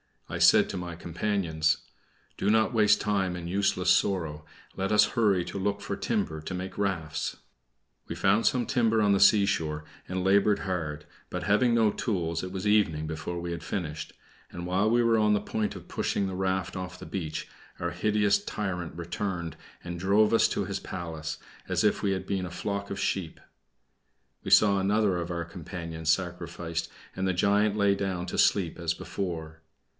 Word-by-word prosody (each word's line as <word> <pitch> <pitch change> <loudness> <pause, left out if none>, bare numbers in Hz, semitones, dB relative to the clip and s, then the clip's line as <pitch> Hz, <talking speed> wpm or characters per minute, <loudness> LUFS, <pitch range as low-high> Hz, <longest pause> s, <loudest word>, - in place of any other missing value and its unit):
I - - -4
said - - +6
to - - -4
my 90 -1 -5
companions: 85 -3 0 0.6
"Do 100 - 0
not 110 +2 +3
waste 105 -2 +4
time 95 -4 0
in 85 -1 -6
useless 95 -1 +2
sorrow; 80 -6 +1 0.3
let 95 +1 -2
us 105 -1 +6
hurry 105 -7 +3
to 100 - -5
look 100 +1 -1
for - - -3
timber 80 -1 -2
to 85 - -6
make 95 +1 -6
rafts." 85 -6 -2 0.7
We - - -5
found 100 +4 +3
some 125 -2 +2
timber 115 -2 +2
on 105 -1 +4
the 100 - +3
seashore, 95 -7 +3 0.2
and 90 0 -2
labored 100 +2 +4
hard; 80 -5 -3 0.2
but 90 0 -4
having 105 +6 +3
no 110 -2 +4
tools, 90 - -2
it 90 - -5
was 95 0 -4
evening 100 -8 +2
before 80 +2 -4
we 85 0 -4
had 85 - -4
finished; 80 -6 -4 0.4
and 85 0 -6
while 95 +4 +2
we 120 +1 +3
were 115 -1 +3
on 105 -1 +4
the 105 - +2
point 105 -2 -2
of 90 -2 -11
pushing 100 - -1
the 95 - -4
raft 95 -1 -1
off 90 0 -6
the - - -10
beach, 80 -6 -4 0.3
our - - -2
hideous 105 -1 +2
tyrant 90 -5 -4
returned 85 0 -4 0.3
and 85 0 -5
drove 105 +4 +3
us 115 - +5
to - - -1
his - - -3
palace, 80 -3 -5 0.3
as - - 0
if - - +2
we 100 -1 +1
had 95 0 -4
been 95 -2 -1
a - - -5
flock 100 +2 -3
of 100 - -4
sheep. 90 -5 -2 1.0
We - - -4
saw 100 -2 +6
another 100 -1 +2
of 85 -1 -3
our 85 -1 -3
companions 85 -2 -6
sacrificed, 85 -2 -2 0.3
and 95 0 -1
the 95 - +1
giant 100 +3 +2
lay 100 -1 +3
down 95 -3 -2
to - - -4
sleep 90 -5 +2
as 85 -1 0
before. 80 -5 -5
95 Hz, 185 wpm, -28 LUFS, 85-100 Hz, 1.0 s, said